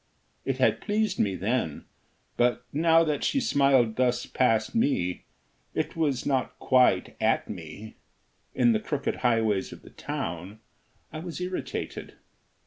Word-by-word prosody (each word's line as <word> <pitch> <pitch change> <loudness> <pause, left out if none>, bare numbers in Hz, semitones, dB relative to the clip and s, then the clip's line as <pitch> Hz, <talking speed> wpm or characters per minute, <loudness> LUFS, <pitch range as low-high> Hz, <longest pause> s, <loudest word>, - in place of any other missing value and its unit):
It - - -1
had - - +2
pleased 210 -2 0
me 100 -3 +1
then; 100 - -2 0.5
but, 120 0 +1
now 165 +2 +4
that 150 -3 -1
she 275 - +1
smiled 135 - +3
thus 125 -1 +1
past 115 -4 +1
me 90 - 0 0.5
it - - -2
was 145 -6 0
not 135 -3 -1
quite 125 -8 +3
at - - +2
me 95 +4 -9 0.6
in 120 -2 +4
the 110 - +2
crooked 140 +4 -2
highways 110 -5 +1
of - - -11
the - - -14
town, 90 +5 -5 0.5
I 155 - -5
was 170 +1 -6
irritated. 180 +1 -5
125 Hz, 135 wpm, -27 LUFS, 110-155 Hz, 0.6 s, now